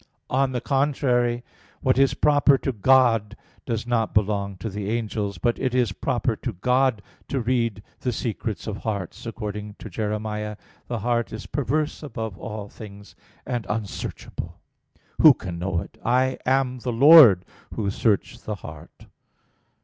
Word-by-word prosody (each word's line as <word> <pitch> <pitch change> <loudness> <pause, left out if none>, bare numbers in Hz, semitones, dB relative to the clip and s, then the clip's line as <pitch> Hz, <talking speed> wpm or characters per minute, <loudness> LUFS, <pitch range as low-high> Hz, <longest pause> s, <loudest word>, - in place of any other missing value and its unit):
On 135 +1 +2
the 125 -2 -2
contrary, 125 -4 +1 0.4
What 130 0 +2
is 135 0 +4
proper 145 -2 +4
to 135 - -2
God 115 -2 +3 0.3
does 115 -2 -2
not 115 -2 0
belong 100 -2 0
to 110 - -5
the 100 -1 -4
angels. 110 -3 -2
But 120 -1 0
it 130 -1 -1
is 125 -5 +2
proper - - -1
to - - -4
God 125 +3 +1 0.2
to 135 - -1
read 115 -4 0 0.2
the 125 - -1
secrets 110 -2 -4
of 105 -2 -4
hearts, 100 -1 -5
according 105 -2 -5
to 110 - -10
Jer. 105 +3 -2
17:9: 105 0 -3 0.3
"The 120 - -2
heart 120 -1 0
is 110 - -7
perverse 145 +3 -1
above 110 - -5
all 105 -2 -6
things, 100 -2 -12 0.3
and 120 -5 -3
unsearchable; 105 -2 -5 0.6
who - - +9
can 85 -2 -6
know 90 -1 -1
it? - - -12
I 130 +2 +2
am 130 -1 +1
the 125 +1 -3
Lord, 125 - +8 0.3
Who 105 - -2
search 115 +3 0
the 105 - -4
heart." 80 -6 -12
115 Hz, 155 wpm, -24 LUFS, 105-125 Hz, 0.6 s, who